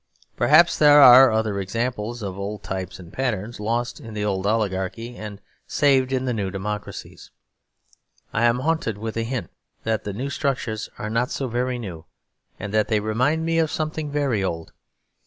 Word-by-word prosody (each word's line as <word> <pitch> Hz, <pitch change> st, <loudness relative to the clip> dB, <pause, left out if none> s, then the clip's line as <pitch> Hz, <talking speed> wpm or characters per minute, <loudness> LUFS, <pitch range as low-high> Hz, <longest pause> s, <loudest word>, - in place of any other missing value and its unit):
Perhaps 170 Hz, +3 st, +5 dB
there 150 Hz, -1 st, +7 dB
are 130 Hz, -1 st, +9 dB
other 110 Hz, -2 st, 0 dB
examples 115 Hz, +3 st, -3 dB
of 95 Hz, -2 st, -4 dB
old 100 Hz, +1 st, -5 dB
types 95 Hz, -1 st, -5 dB
and 90 Hz, -2 st, -13 dB
patterns, 115 Hz, -4 st, -3 dB
lost 115 Hz, +6 st, -2 dB
in 115 Hz, -6 st, -10 dB
the 105 Hz, 0 st, -2 dB
old 100 Hz, -1 st, -1 dB
oligarchy 110 Hz, +2 st, -2 dB
and 105 Hz, -2 st, -8 dB, 0.3 s
saved 135 Hz, -2 st, +2 dB
in 130 Hz, -1 st, 0 dB
the 125 Hz, -, 0 dB
new 100 Hz, -4 st, -2 dB
democracies. 105 Hz, +2 st, -6 dB, 1.0 s
I 115 Hz, +2 st, +2 dB
am 120 Hz, +1 st, +2 dB
haunted 155 Hz, -8 st, -1 dB
with 110 Hz, +1 st, -5 dB
a 115 Hz, -, -1 dB
hint 115 Hz, -5 st, -4 dB, 0.3 s
that 110 Hz, -2 st, -1 dB
the 105 Hz, -, -4 dB
new 130 Hz, +7 st, -4 dB
structures 125 Hz, -6 st, -2 dB
are 105 Hz, -, -5 dB
not 120 Hz, +3 st, 0 dB
so 135 Hz, -, -3 dB
very 125 Hz, +1 st, -1 dB
new; 90 Hz, -9 st, -7 dB, 0.5 s
and 105 Hz, -, -6 dB
that 110 Hz, -1 st, +2 dB
they 110 Hz, -2 st, +1 dB
remind 125 Hz, +10 st, 0 dB
me 165 Hz, 0 st, +1 dB
of 160 Hz, -1 st, +2 dB
something 155 Hz, -1 st, -3 dB
very 140 Hz, -8 st, 0 dB
old. 80 Hz, -3 st, -4 dB
115 Hz, 175 wpm, -23 LUFS, 105-130 Hz, 1.0 s, are